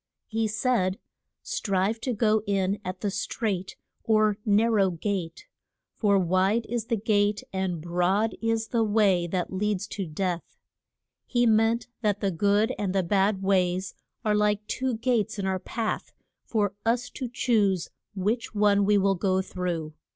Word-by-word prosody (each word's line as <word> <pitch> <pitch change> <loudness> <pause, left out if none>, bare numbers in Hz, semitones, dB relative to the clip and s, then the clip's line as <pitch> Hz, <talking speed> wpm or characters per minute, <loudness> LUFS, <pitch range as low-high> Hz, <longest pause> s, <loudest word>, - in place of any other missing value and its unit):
He 225 0 -1
said, 215 -4 0 0.5
Strive 215 - -1
to 255 - -1
go 215 -1 +2
in 195 0 0
at 185 0 -5
the 205 - -1
strait, 195 -2 -3 0.3
or 215 -1 +2
nar 215 +3 +4
row 200 -4 +3
gate; 175 -1 -3 0.5
for 200 -3 +3
wide 190 +5 +2
is 235 -2 -2
the 230 -1 0
gate 205 0 +1
and 190 -3 -1
broad 180 +6 +1
is 225 -1 0
the 230 -2 +2
way 205 -5 +3
that 180 +1 -2
leads 205 0 -1
to 195 -4 -4
death. 175 +2 -3 0.7
He 245 -1 +2
meant 225 +1 +3 0.2
that 210 -3 +1
the 195 - 0
good 205 +5 +2
and 195 -2 -1
the 190 - +2
bad 195 +2 +1
ways 185 -1 +1 0.3
are 210 - +3
like 210 0 +1
two 255 +1 -2
gates 225 -3 0
in 200 - -2
our 190 -1 0
path, 225 +3 -3 0.3
for 205 -3 0
us 235 +2 0
to 255 -3 -5
choose 205 -7 +1 0.2
which 215 +4 -1
one 205 -1 +4
we 205 0 +4
will 195 0 +3
go 190 0 +1
through. 175 -5 -4
205 Hz, 160 wpm, -26 LUFS, 190-220 Hz, 0.7 s, nar